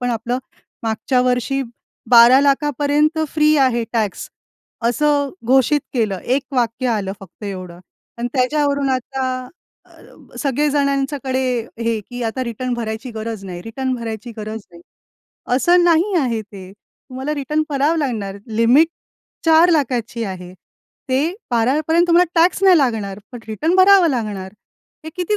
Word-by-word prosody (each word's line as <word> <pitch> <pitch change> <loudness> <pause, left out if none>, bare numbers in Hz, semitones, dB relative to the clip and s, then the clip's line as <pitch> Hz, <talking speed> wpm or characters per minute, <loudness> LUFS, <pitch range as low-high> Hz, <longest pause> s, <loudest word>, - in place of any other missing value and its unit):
पण 245 0 -1
आपलं, 240 +2 -2 0.5
मागच्या 225 +3 0
वर्षी 255 +2 0 0.5
12,00,000पर्यंत 285 +5 +4
फ्री 305 +1 +3
आहे 255 -4 +2
टॅक्स, 215 -5 -2 0.6
असं 285 +2 +1 0.2
घोषित 265 +3 +3
केलं. 215 -6 0
एक 260 +3 +1
वाक्य 245 0 0
आलं 205 -4 -1
फक्त 195 +2 -13
एवढं 185 -3 -7 0.4
आणि 240 +1 -2
त्याच्यावरून 280 +1 +1
आता 265 +1 -2 0.6
अ, - - -19
सगळे 290 +1 +1
जणांच्याकडे, 275 -2 0 0.4
हे, 230 -1 -1
की 245 +4 -8
आता 225 +4 -2
रिटर्न 245 +1 -3
भरायची 230 +2 -5
गरज 220 -2 -6
नाही, 180 -2 -7
रिटर्न 260 +4 -3
भरायची 230 -1 -6
गरज 215 +1 -6
नाही. 170 -1 -15 0.8
असं 350 +6 +4
नाही 345 +4 +3
आहे 235 -5 -1
ते, 195 -3 -12
तुम्हाला 265 +6 -7
रिटर्न 300 +2 -1
भरावं 290 +4 +1
लागणार, 215 -9 -3 0.2
लिमिट 245 +8 +5 0.6
4,00,000ची 280 -9 +3
आहे. 180 -2 -7 0.6
ते 260 +1 +2 0.3
12पर्यंत 295 +9 +2
तुम्हाला 345 0 +4
टॅक्स 365 +3 +2
नाही 370 -3 +7
लागणार, 220 -8 -1
पण 245 - -7
रिटर्न 310 - 0
भरावं 380 -2 +6
लागणार. 205 -6 -4 0.5
हे 315 - -6
किती 365 +4 0
255 Hz, 130 wpm, -19 LUFS, 225-290 Hz, 0.8 s, नाही